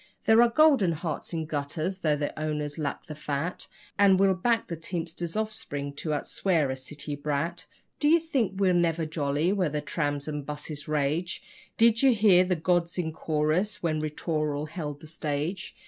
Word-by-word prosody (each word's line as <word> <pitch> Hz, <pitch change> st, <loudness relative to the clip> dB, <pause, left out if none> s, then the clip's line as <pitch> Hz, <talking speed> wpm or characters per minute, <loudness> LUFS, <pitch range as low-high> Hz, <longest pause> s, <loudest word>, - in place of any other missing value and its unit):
There 220 Hz, +1 st, +6 dB
are 240 Hz, -, +5 dB
golden 260 Hz, -, +4 dB
hearts 160 Hz, -1 st, -4 dB
in 165 Hz, -2 st, -2 dB
gutters, 155 Hz, +5 st, -3 dB
though 155 Hz, -5 st, +2 dB
their 145 Hz, 0 st, -2 dB
owners 150 Hz, 0 st, -3 dB
lack 145 Hz, -2 st, -3 dB
the 155 Hz, -, -7 dB
fat, 150 Hz, +3 st, -3 dB, 0.3 s
And 195 Hz, -2 st, +6 dB
we'll 195 Hz, -1 st, +5 dB
back 225 Hz, +3 st, 0 dB
a -, -, -1 dB
teamster's 165 Hz, +1 st, -4 dB
offspring 215 Hz, -10 st, -3 dB
to 160 Hz, -, -4 dB
outswear 155 Hz, 0 st, 0 dB
a -, -, -2 dB
city 145 Hz, +3 st, -6 dB
brat. 150 Hz, +4 st, -3 dB, 0.3 s
Do 295 Hz, -, +2 dB
you 330 Hz, +3 st, +6 dB
think 255 Hz, -, -1 dB
we're 190 Hz, -2 st, +4 dB
never 170 Hz, -2 st, +2 dB
jolly 155 Hz, +2 st, 0 dB
where 185 Hz, -5 st, +1 dB
the 150 Hz, 0 st, -2 dB
trams 145 Hz, -1 st, -2 dB
and 150 Hz, -1 st, -3 dB
buses 150 Hz, +1 st, -6 dB
rage? 155 Hz, +4 st, -1 dB, 0.3 s
Did 230 Hz, 0 st, +5 dB
you 265 Hz, -3 st, +5 dB
hear 200 Hz, -4 st, +6 dB
the 180 Hz, 0 st, 0 dB
gods 170 Hz, +1 st, 0 dB
in 160 Hz, -3 st, -2 dB
chorus 160 Hz, +8 st, 0 dB
when 155 Hz, -2 st, 0 dB
'Ri 155 Hz, -, -1 dB
tooral' 150 Hz, -1 st, -2 dB
held 150 Hz, -4 st, -5 dB
the -, -, -11 dB
stage? 155 Hz, +3 st, -3 dB
160 Hz, 180 wpm, -27 LUFS, 150-185 Hz, 0.3 s, There